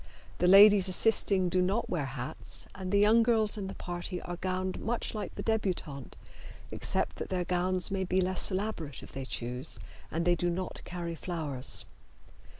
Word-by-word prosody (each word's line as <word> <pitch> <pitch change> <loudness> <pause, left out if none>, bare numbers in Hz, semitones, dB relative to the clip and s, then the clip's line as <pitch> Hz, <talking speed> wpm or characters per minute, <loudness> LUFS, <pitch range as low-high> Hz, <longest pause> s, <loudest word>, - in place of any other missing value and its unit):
The 180 - +2
ladies 200 0 +8
assisting 190 -1 +4
do 185 +1 +1
not 200 +6 0
wear 155 -6 -2
hats, 130 -2 -5
and 185 -1 -6
the 200 - +3
young 215 +3 +5
girls 225 -2 +2
in 200 -3 -5
the 195 - -7
party 175 +1 -5
are 175 0 -6
gowned 185 +1 -3
much 235 +2 -2
like 210 -3 -6
the - - -5
debutante, 180 - -3 0.6
except - - 0
that - - -6
their 180 -2 -2
gowns 180 +1 0
may 195 -1 -1
be 185 0 0
less 185 0 +2
elaborate 185 - -4
if - - -12
they 135 -1 -6
choose, 125 0 -2 0.3
and 165 +1 -2
they 175 - +4
do 175 0 -1
not 180 +1 -4
carry 175 -1 -5
flowers. 155 -6 -1
185 Hz, 175 wpm, -30 LUFS, 170-200 Hz, 0.6 s, ladies